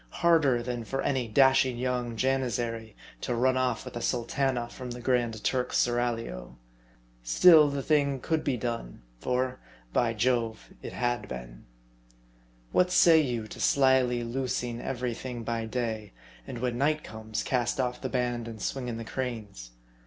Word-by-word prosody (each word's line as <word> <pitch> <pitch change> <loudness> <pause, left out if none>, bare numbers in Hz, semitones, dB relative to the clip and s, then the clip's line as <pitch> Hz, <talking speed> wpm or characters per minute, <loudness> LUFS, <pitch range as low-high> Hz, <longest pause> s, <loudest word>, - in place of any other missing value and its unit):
Harder 155 -8 +4
than 120 -1 -3
for 135 +4 -3
any 130 -4 0
dashing 130 +1 +4
young 125 -1 -2
Janizary 120 -3 -1 0.3
to 120 - -1
run 130 +2 +2
off 130 -2 0
with - - -8
a 120 - -4
sultana 125 +1 0
from 125 +1 -8
the 120 0 -6
Grand 120 -3 0
Turk's 125 -1 0
seraglio. 115 - -1 0.6
Still, 150 - +7
the 140 -1 -3
thing 140 -3 +2
could 160 +4 -1
be 130 -3 0
done, 115 - -5 0.2
for, 130 - -1 0.3
by 115 -1 +1
Jove, 115 -1 -1
it - - -7
had 120 0 -1
been. 60 -1 -8 1.1
What 180 - +3
say 165 -3 +6
you 120 -6 -2
to - - -9
slyly 130 -3 +3
loosing 120 -1 -2
every 125 -2 -2
thing 120 0 -6
by 115 0 -2
day; 110 -3 -3 0.3
and - - -6
when 120 0 -2
night 150 +2 +1
comes, 110 0 -5
cast 125 0 0
off 125 -1 -1
the - - -3
band 120 -2 -1
and 115 -1 -8
swing 130 +2 -3
in 115 -2 -3
the 115 - -6
cranes 110 - -5
125 Hz, 160 wpm, -28 LUFS, 115-130 Hz, 1.1 s, Still